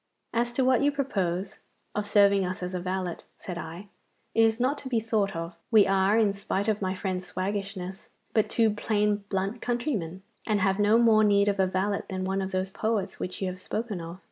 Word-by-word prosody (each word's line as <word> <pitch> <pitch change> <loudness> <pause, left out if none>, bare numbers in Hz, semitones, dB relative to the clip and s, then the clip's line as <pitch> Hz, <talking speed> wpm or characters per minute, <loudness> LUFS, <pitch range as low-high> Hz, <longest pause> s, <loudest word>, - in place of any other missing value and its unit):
'As 240 +1 +1
to 260 +1 +1
what 255 -1 +4
you 290 +1 +3
proposed, 195 -10 -2 0.3
of 210 0 -2
serving 200 -1 +5
us 185 +1 -3
as 180 +1 -4
a 180 - -1
valet,' 185 -1 -2 0.2
said 175 -2 -6
I, 170 +5 -8 0.4
'it 225 - +4
is 225 +1 +3
not 260 +4 +1
to 265 - -7
be 235 -3 +2
thought 215 -4 0
of. 165 +1 -4 0.2
We 215 -3 +6
are, 195 +2 +3
in 210 -3 +3
spite 200 0 -2
of 215 -1 +1
my 190 0 -1
friend's 185 -2 -4
waggishness, 195 0 -4 0.2
but 220 - +2
two 225 -2 +3
plain 210 0 +1
blunt 195 +4 -2
countrymen, 220 - -2 0.2
and 215 -2 +2
have 195 +1 +1
no 210 +2 +5
more 225 -2 +5
need 200 -1 +4
of 200 -1 +1
a 190 - +4
valet 190 +2 0
than 185 -1 -3
one 195 +1 0
of 190 - -2
those 190 0 -1
poets 210 -2 -2
which 185 +2 -4
you - - 0
have 185 0 -10
spoken 215 -2 -3
of. 170 +2 -8
200 Hz, 215 wpm, -27 LUFS, 185-220 Hz, 0.4 s, We